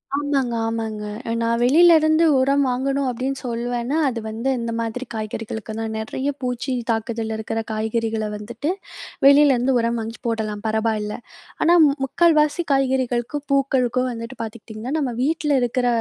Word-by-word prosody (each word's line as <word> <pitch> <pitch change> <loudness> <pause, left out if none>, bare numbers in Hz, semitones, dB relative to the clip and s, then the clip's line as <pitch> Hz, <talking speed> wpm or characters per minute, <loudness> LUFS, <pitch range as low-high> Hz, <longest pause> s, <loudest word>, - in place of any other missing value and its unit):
ஆமாங்க, 280 -4 0
ஆமாங்க. 225 -2 -3 0.3
அ - - 0
நான் 230 0 +1
வெளில 335 +7 +6
இருந்து 315 +1 +3
உரம் 275 +2 +3
வாங்கணும் 270 +2 0
அப்பிடின்னு 260 +3 -3
சொல்வேன்னா, 240 +3 -2
அது 240 -2 -4
வந்து 230 +5 -2
இந்த 230 0 -3
மாதிரி 230 +3 -4
காய்கறிகளுக்குதான். 220 0 -5
நிறைய 260 +5 -3
பூச்சியின் 250 -1 -2
தாக்குதல்ல 225 0 -2
இருக்கிற 220 +1 -3
காய்கறிகள 220 0 -1
வந்துட்டு, 235 +8 -5 0.6
வெளியிலேருந்து 275 -3 +5
உரம் 235 0 0
வாங்கி 225 +1 -6
போடலாம், 215 -2 -2
பரவாயில்ல. 220 -1 -1 0.5
ஆனா 345 - +5
மு 290 - +4
முக்கால்வாசி 310 +2 +3
காய்கறிகளுக்கும், 265 +1 0
பூக்களுக்கும் 255 -2 +1
வந்துட்டு 230 +2 -7
பார்த்துக்கிட்டீங்கன்னா, 225 +3 -7
நம்ம 265 -5 -1
வீட்ல 300 -1 +1
இருக்கிற 245 +1 0
240 Hz, 135 wpm, -22 LUFS, 225-275 Hz, 0.6 s, வெளில